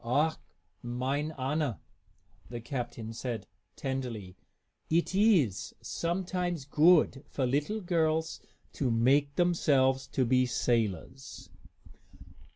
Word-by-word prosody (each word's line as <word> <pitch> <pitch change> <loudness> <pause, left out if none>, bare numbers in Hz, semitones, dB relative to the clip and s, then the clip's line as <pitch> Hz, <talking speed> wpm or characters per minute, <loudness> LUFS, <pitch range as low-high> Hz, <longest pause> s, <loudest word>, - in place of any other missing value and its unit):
"Ach, 145 +7 +2 0.5
mine 130 +5 -2
Anna," 135 - -1 0.7
the 120 0 -5
captain 120 -2 -5
said, 120 -1 -4 0.3
tenderly, 120 -9 -4 0.5
"it 170 +3 +1
iss 190 - +2
sometimes 175 -2 -2
goodt 150 -1 +4
for 135 - -1
little 150 - 0
girls 160 -3 0 0.3
to 135 - -1
make 135 +5 +3
themselves 135 -7 +2
to 135 -1 0
be 125 +1 +3
sailors!" 120 +1 -2
135 Hz, 95 wpm, -30 LUFS, 120-160 Hz, 0.7 s, goodt